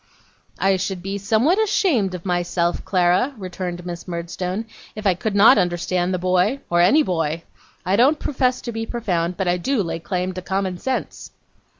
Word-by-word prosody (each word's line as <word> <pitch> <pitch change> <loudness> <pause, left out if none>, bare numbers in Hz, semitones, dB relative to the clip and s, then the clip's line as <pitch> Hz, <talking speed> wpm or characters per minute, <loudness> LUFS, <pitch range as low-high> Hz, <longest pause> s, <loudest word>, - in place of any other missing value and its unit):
'I 195 0 +2
should 185 -1 -3
be 195 +1 -3
somewhat 230 - +2
ashamed 275 - +1
of 180 - -9
myself, 175 -1 0
Clara,' 185 +9 +2
returned 180 -2 -5
Miss 175 0 -7
Murdstone, 180 +4 -4 0.3
'if 215 0 -7
I 195 - +4
could 200 +4 -3
not 220 +6 +7
understand 175 +1 0
the 185 - 0
boy, 185 +8 +1
or 175 0 +4
any 250 - +5
boy. 165 - -1 0.4
I 185 +2 +2
don't 275 +6 +4
profess 255 -3 0
to 240 - -5
be 225 0 -4
profound; 180 -7 -2
but 190 - -1
I 175 0 +2
do 235 +4 0
lay 165 -1 -4
claim 180 +2 -2
to 185 - -6
common 190 0 -2
sense. 260 +5 -4
185 Hz, 180 wpm, -21 LUFS, 175-220 Hz, 0.4 s, not